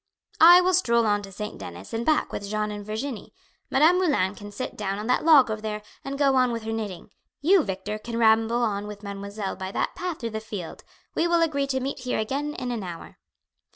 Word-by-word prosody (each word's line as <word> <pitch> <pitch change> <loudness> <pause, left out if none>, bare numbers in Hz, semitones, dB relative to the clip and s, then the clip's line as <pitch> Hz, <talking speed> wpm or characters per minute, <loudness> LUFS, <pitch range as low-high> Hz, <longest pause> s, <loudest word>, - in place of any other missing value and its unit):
"I 350 +2 +9
will 370 +1 +2
stroll 235 -10 +3
on 205 -1 +2
to 195 -1 -10
St. 210 +2 -6
Denis 90 +2 -9
and 225 +1 -1
back 310 +4 +1
with 200 - -4
Jeanne 210 0 -1
and 205 0 -6
Virginie; 220 - -5 0.3
Madame 315 +7 +4
Moulin 270 - +1
can 205 0 -10
sit 255 - -5
down 195 -1 -3
on 210 - -5
that 250 +2 +1
log 295 -7 +6
over 215 0 -4
there, 210 -1 -4 0.2
and 275 0 -5
go 275 -2 +3
on 255 -1 +3
with 230 -1 -4
her 220 - -4
knitting; 210 -3 -5 0.3
you, 365 +5 +5
Victor, 200 -1 -4
can 230 +1 -5
ramble 225 +1 +3
on 205 -2 -1
with 210 0 -9
mademoiselle 200 0 -5
by 190 0 -6
that - - -1
path 360 -3 -4
through 230 -2 -4
the 220 - -3
field; 210 -6 -7 0.3
we 335 - +1
will 340 -1 +3
agree 280 -4 0
to 265 -1 0
meet 270 +2 -4
here 250 0 -2
again 275 +7 -2
in 250 -1 -4
an 235 -3 -3
hour." 175 -3 -8
225 Hz, 225 wpm, -25 LUFS, 205-275 Hz, 0.3 s, I